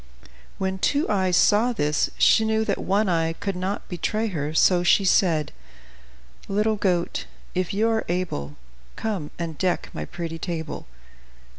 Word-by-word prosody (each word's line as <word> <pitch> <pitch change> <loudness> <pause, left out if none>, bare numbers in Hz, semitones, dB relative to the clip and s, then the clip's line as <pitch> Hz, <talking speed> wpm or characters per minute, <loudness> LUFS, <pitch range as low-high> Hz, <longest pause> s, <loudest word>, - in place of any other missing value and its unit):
When 190 0 -2
Two 285 - +1
Eyes 185 -3 +2
saw 225 +4 +4
this, 150 -8 +1
she 220 - +5
knew 220 0 +1
that 200 - -1
One 200 +2 +1
Eye 165 -2 +1
could 195 +3 -4
not 185 +3 -3
betray 215 +6 -1
her, 150 -5 -3
so 175 +3 +4
she 185 +3 +4
said: 165 -5 +3 1.0
"Little 210 +2 +1
goat, 180 -4 -1 0.3
if 185 -1 -1
you 215 +3 +1
are 225 -1 +1
able, 120 - -2 0.4
Come 200 -9 -3
and 165 -3 -5
deck 185 -2 0
my - - -4
pretty 165 -2 -6
table." 160 - -5
185 Hz, 150 wpm, -24 LUFS, 165-210 Hz, 1.0 s, she